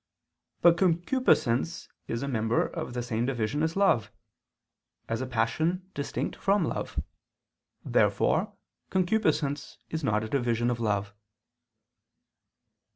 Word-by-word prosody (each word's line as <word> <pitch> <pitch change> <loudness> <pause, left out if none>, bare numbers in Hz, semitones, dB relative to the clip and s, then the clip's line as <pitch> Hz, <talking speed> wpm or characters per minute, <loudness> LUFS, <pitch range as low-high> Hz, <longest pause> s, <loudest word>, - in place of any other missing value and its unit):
But 170 -1 +7
concupiscence 170 - +2 0.2
is 115 +3 -2
a - - -2
member 115 -3 +1
of 120 - -5
the 120 - -1
same 120 0 -1
division 120 +1 -1
as 160 +1 0
love, 195 - +3 1.0
as 115 +2 -2
a 130 - -3
passion 160 +11 0
distinct 140 - -3
from 200 +1 +2
love. - - -3 0.9
Therefore - - +2 0.4
concupiscence 175 -7 0
is 160 -1 -3
not 110 -4 +1
a - - -3
division 120 -1 +1
of 120 - -2
love. 105 -3 -1
135 Hz, 115 wpm, -28 LUFS, 115-170 Hz, 1.0 s, But